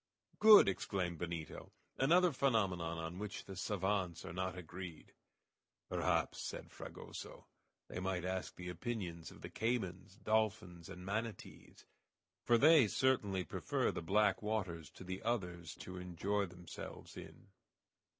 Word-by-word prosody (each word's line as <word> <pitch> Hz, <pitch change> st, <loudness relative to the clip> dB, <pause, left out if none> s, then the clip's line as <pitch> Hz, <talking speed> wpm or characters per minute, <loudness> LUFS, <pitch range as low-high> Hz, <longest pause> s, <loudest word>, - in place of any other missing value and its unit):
"Good!" 215 Hz, -, +10 dB
exclaimed 90 Hz, -3 st, -1 dB
Benito. 85 Hz, -3 st, -5 dB, 0.3 s
"Another 175 Hz, +6 st, +5 dB
phenomenon 95 Hz, -, +1 dB
on 80 Hz, +2 st, -5 dB
which 105 Hz, -1 st, -5 dB
the 95 Hz, -, -8 dB
savants 95 Hz, -2 st, -1 dB
are -, -, -6 dB
not 95 Hz, +1 st, -2 dB
agreed." 90 Hz, -1 st, -8 dB, 0.8 s
"Perhaps," -, -, +1 dB
said -, -, -6 dB
Fragoso, -, -, -9 dB, 0.4 s
"they -, -, -5 dB
might 95 Hz, -1 st, -1 dB
ask 95 Hz, 0 st, -3 dB
the 90 Hz, -, -7 dB
opinions 90 Hz, -4 st, -4 dB
of -, -, -14 dB
the -, -, -6 dB
caymans, 100 Hz, -5 st, -2 dB
dolphins, 105 Hz, -5 st, 0 dB
and 90 Hz, +1 st, -8 dB
manatees, 110 Hz, +1 st, -5 dB, 0.6 s
for 120 Hz, -, +5 dB
they 150 Hz, -1 st, +7 dB
certainly 105 Hz, -6 st, +2 dB
prefer 80 Hz, -, 0 dB
the -, -, -4 dB
black 105 Hz, +6 st, +3 dB
waters 95 Hz, -8 st, -2 dB
to -, -, -12 dB
the 95 Hz, +1 st, -5 dB
others 90 Hz, -8 st, -2 dB
to 90 Hz, 0 st, -8 dB
enjoy 95 Hz, +3 st, -1 dB
themselves 90 Hz, 0 st, -9 dB
in." 100 Hz, -, -11 dB
95 Hz, 130 wpm, -37 LUFS, 90-110 Hz, 0.8 s, Good